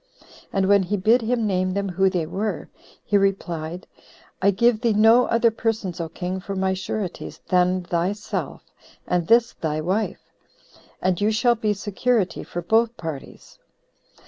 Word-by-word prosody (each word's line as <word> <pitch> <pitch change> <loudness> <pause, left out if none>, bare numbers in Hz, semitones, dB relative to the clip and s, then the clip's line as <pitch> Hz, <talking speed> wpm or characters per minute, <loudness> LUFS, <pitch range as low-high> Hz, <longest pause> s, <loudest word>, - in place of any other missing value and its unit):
And 195 -1 +1
when 200 0 +5
he 195 +3 -1
bid 225 +6 +3
him 230 0 0
name 185 -2 0
them 200 -1 -1
who 190 +1 +2
they 180 -4 -1
were, 195 +6 -3 0.4
he 205 - +3
replied, 175 -3 -2 0.6
"I 195 - +4
give 220 +3 +2
thee 235 -3 +2
no 225 +4 +5
other 230 0 +3
persons, 220 -6 -2
O 165 - -4
king, 180 +3 -4
for 195 +1 -6
my 190 0 0
sureties, 190 0 -5
than 180 0 +2
thyself, 175 +4 -3 0.4
and 175 -2 0
this 235 +1 +4
thy 155 -1 -3
wife; 190 +7 -2 0.7
and 185 0 +1
you 210 - +3
shall 225 +3 +3
be 215 -2 -1
security 205 0 -1
for 175 - -6
both 225 +5 +2
parties." 160 -5 -8
195 Hz, 155 wpm, -23 LUFS, 180-220 Hz, 0.7 s, when